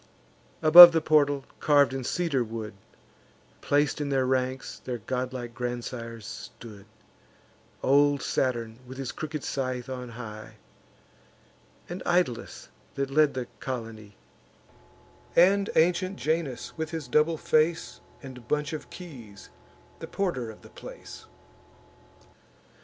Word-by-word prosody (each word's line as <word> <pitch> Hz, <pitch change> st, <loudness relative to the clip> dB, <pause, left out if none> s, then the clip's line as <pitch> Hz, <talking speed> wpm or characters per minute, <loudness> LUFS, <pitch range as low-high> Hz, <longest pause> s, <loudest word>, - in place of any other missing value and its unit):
Above 170 Hz, +2 st, +12 dB
the 165 Hz, -, +3 dB
portal, 145 Hz, -3 st, +2 dB
carv'd 145 Hz, -3 st, +3 dB
in 135 Hz, -1 st, -4 dB
cedar 145 Hz, -2 st, 0 dB
wood, 110 Hz, -2 st, -7 dB, 0.9 s
Plac'd 145 Hz, +1 st, +1 dB
in 145 Hz, -, -2 dB
their 135 Hz, -2 st, +1 dB
ranks, 130 Hz, 0 st, -2 dB
their 125 Hz, -1 st, -4 dB
godlike 125 Hz, +1 st, -4 dB
grandsires 120 Hz, -2 st, -6 dB
stood; 105 Hz, -2 st, -10 dB, 1.0 s
Old 145 Hz, +1 st, +3 dB
Saturn, 115 Hz, -3 st, -2 dB
with 130 Hz, +1 st, -10 dB
his 135 Hz, -2 st, -4 dB
crooked 150 Hz, -1 st, -6 dB
scythe, 130 Hz, -2 st, -3 dB
on 125 Hz, -1 st, -6 dB
high; 110 Hz, -2 st, -9 dB, 1.3 s
And 175 Hz, +2 st, -7 dB
Italus, 175 Hz, -10 st, -1 dB, 0.3 s
that 135 Hz, 0 st, -3 dB
led 150 Hz, 0 st, +3 dB
the 130 Hz, -1 st, -3 dB
colony; 110 Hz, -5 st, -7 dB, 1.2 s
And 195 Hz, +3 st, +4 dB
ancient 180 Hz, +3 st, +2 dB
Janus, 155 Hz, -5 st, -3 dB
with 160 Hz, -1 st, -4 dB
his 160 Hz, -4 st, -6 dB
double 150 Hz, +5 st, +2 dB
face, 155 Hz, +2 st, 0 dB, 0.2 s
And 125 Hz, -3 st, -11 dB
bunch 150 Hz, +2 st, -1 dB
of 155 Hz, -, -7 dB
keys, 125 Hz, -, -12 dB, 0.5 s
the -, -, -7 dB
porter 170 Hz, -, -2 dB
of 110 Hz, -, -13 dB
the -, -, -14 dB
place. -, -, -12 dB
135 Hz, 120 wpm, -27 LUFS, 120-155 Hz, 1.3 s, Above